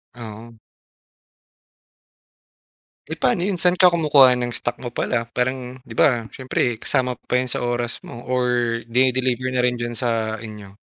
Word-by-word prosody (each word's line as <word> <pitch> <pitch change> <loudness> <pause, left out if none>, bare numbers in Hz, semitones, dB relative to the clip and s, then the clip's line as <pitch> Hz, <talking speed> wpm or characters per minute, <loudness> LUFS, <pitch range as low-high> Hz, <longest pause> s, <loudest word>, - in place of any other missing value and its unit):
Oo. 115 0 -10 2.5
Eh, - - -5
pa'no 125 - +2
'yon? 190 0 -1
Saan 180 +1 +3
ka 180 - +8
kumukuha 145 -7 +5
ng 120 -1 -3
stock 120 - -3
mo 120 -2 -7
pala? 115 -2 -1
Parang 125 0 -3
'di 115 -4 -12
ba 120 -4 +2
siyempre 125 -3 -2
kasama 125 +2 0
pa - - -8
'yan 130 - -4
sa - - +1
oras 120 -1 -2
mo 120 - -9
or 125 -1 +1 0.5
dini-deliver 130 0 +1
na 125 -1 0
rin 125 - +2
diyan 120 0 -4
sa 110 -2 -1
inyo? 105 -2 -10
125 Hz, 155 wpm, -22 LUFS, 115-130 Hz, 2.5 s, ka